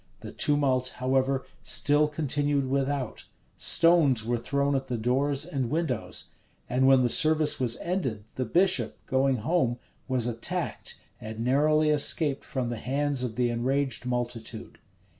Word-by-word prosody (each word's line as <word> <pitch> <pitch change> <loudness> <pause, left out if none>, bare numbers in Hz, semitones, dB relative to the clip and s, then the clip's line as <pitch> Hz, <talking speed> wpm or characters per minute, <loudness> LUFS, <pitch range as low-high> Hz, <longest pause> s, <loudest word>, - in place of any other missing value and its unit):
The - - -8
tumult, 135 -3 +1
however, 130 +1 0 0.2
still 145 +1 +3
continued 145 -2 0
without: 135 -2 -2 0.3
stones 150 -9 +3
were 120 0 0
thrown 140 +3 0
at 135 - -2
the 125 - -2
doors 135 +5 0
and 130 -4 -3
windows: 155 -7 -3 0.4
and 130 +2 +2
when 135 -1 +6
the - - +3
service 155 +3 +2
was 120 -3 0
ended, 135 - -3
the 130 - -2
bishop, 170 - +1
going 135 0 +2
home, 125 -1 0 0.3
was 130 -3 0
attacked, 115 -1 -3 0.2
and 110 +1 -7
narrowly 150 +4 +3
escaped 145 -1 +1
from 130 -3 -3
the 120 - -4
hands 140 +2 -1
of 120 -3 -3
the 125 -1 +1
enraged 130 +2 -1
multitude. 120 -2 -4
135 Hz, 140 wpm, -27 LUFS, 125-145 Hz, 0.4 s, when